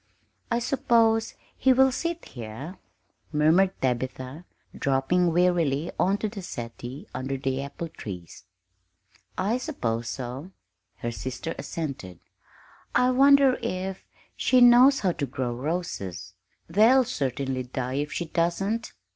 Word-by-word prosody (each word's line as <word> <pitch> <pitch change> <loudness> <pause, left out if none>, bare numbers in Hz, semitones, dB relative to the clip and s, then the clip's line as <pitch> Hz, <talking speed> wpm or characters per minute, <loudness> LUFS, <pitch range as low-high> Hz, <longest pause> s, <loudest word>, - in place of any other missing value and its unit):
"I 235 - +1
suppose 230 -3 +2 0.2
he 265 - +4
will 265 +1 +5
sit 335 +5 -3
here," 125 - -8 0.5
murmured 160 +6 +3
Tabitha, 130 +4 -3 0.3
dropping 140 +6 +1
wearily 170 -3 +2
on 195 +2 +3
to 215 - -2
the 205 -1 -7
settee 120 -3 -7
under 135 +1 -3
the 135 0 -2
apple 140 +4 -6
trees. 95 - -9 0.9
"I 210 +7 0
suppose 115 - -3
so," 130 +8 -6 0.4
her 120 - -4
sister 130 +7 -5
assented. 135 - -5 0.8
"I 250 0 +4
wonder 275 0 +5
if 190 +1 -4 0.3
she 255 - +3
knows 245 +3 +7
how 190 -3 +2
to 145 -4 -3
grow 125 -2 -3
roses; 120 - -4 0.3
they'll 225 +9 +5
certainly 135 - -2
die 130 +1 -4
if 145 0 -5
she 175 - -2
doesn't!" 195 +8 -1
165 Hz, 120 wpm, -26 LUFS, -, 0.9 s, knows